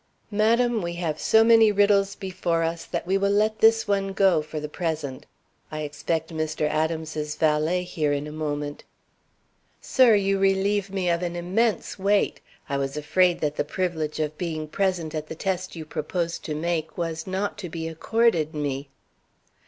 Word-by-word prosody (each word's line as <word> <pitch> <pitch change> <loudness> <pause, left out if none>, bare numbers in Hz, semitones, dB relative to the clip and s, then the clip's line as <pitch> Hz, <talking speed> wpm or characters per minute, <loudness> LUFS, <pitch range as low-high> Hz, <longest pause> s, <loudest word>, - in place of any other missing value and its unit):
"Madam, 230 +2 +2
we 170 -1 -3
have 170 -3 -3
so 220 0 +5
many 225 -1 +6
riddles 200 -1 +3
before 185 -4 -1
us 165 0 -2
that - - -4
we 190 +2 +1
will 200 0 +2
let 215 +2 +2
this 225 0 +5
one 195 -1 0
go 190 -5 +4
for 155 0 -6
the 150 - -4
present. 150 -4 -4 0.4
I 155 0 -4
expect 160 +2 -3
Mr. 155 -1 -1
Adams's 155 -1 -2
valet 160 +3 +1
here 155 -4 -1
in 145 0 -1
a 150 - -7
moment." 145 -1 -4 1.0
"Sir, 250 -5 +5
you 195 -1 +1
relieve 195 +1 +2
me 190 -2 -2
of 170 0 0
an 175 -1 -3
immense 200 +6 0
weight. 200 +1 +1 0.3
I 140 - -1
was 135 +1 -3
afraid 175 +4 +2
that 150 -1 -1
the - - +1
privilege 160 -2 -2
of 155 0 -2
being 160 -3 -3
present 175 -2 -1
at 155 -1 -4
the 160 - -6
test 185 +1 -3
you 160 -1 -7
propose 170 +3 -3
to 155 - -5
make 160 0 -2
was 165 -1 -3
not 195 +2 -2
to 180 -4 -5
be 160 0 -4
accorded 165 -1 +1
me." 140 -1 -3
170 Hz, 175 wpm, -25 LUFS, 155-195 Hz, 1.0 s, many